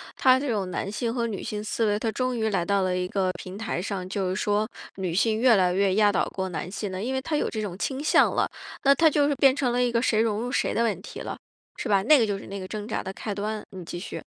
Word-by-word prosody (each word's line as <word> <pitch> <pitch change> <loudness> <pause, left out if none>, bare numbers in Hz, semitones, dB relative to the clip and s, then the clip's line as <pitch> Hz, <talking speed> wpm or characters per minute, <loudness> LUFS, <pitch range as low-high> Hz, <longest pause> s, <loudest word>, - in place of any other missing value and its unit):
它 260 0 +5
这 290 - -3
种 200 -5 -1
男 195 +2 -3
性 230 +1 -2
和 235 -2 0
女 215 -4 -4
性 210 0 -4
思 225 +1 -1
维， 205 - +2
它 220 +1 -1
终 255 +2 -1
于 220 -1 +1
来 190 -4 0
到 200 +1 +1
了 185 -1 0
一 180 0 -1
个 185 -1 0
平 185 +1 -8
台 220 -5 -3
上， 190 -2 -4
就 190 -1 -2
是 185 - -1
说 210 +1 0 0.3
女 185 -3 -2
性 220 +3 +2
越 245 -2 +6
来 180 -2 +3
越 195 0 +2
压 210 -1 +5
倒 195 - +1
过 190 -1 -3
男 180 +1 -4
性 200 0 -4
了， 185 +1 -4
因 255 +4 -2
为 265 - -1
它 310 +2 -2
有 - - 0
这 220 - -4
种 200 -4 -4
倾 270 +6 -3
向 - - +4
了， - - +1 0.3
那 275 -1 +7
它 320 +3 +5
就 290 -1 +2
是 290 - +2
变 270 -1 +5
成 260 -4 0
了 245 +1 +2
一 245 - +1
个 230 - +2
谁 220 -3 +2
融 215 -2 0
入 245 +1 -3
谁 - - +1
的 230 - +2
问 205 -6 -1
题 - - -8
了， - - -5 0.4
是 255 - -4
吧？ 195 -2 +3
那 285 +5 +6
个 230 - +4
就 200 -1 -1
是 - - -10
那 195 0 -6
个 185 - -6
挣 210 0 -5
扎 225 - -2
的 190 - -5
开 210 - -4
端， 210 +1 -3
你 185 -2 -8
继 175 - -6
续。 180 - -6
210 Hz, 320 characters per minute, -26 LUFS, 190-240 Hz, 0.4 s, 那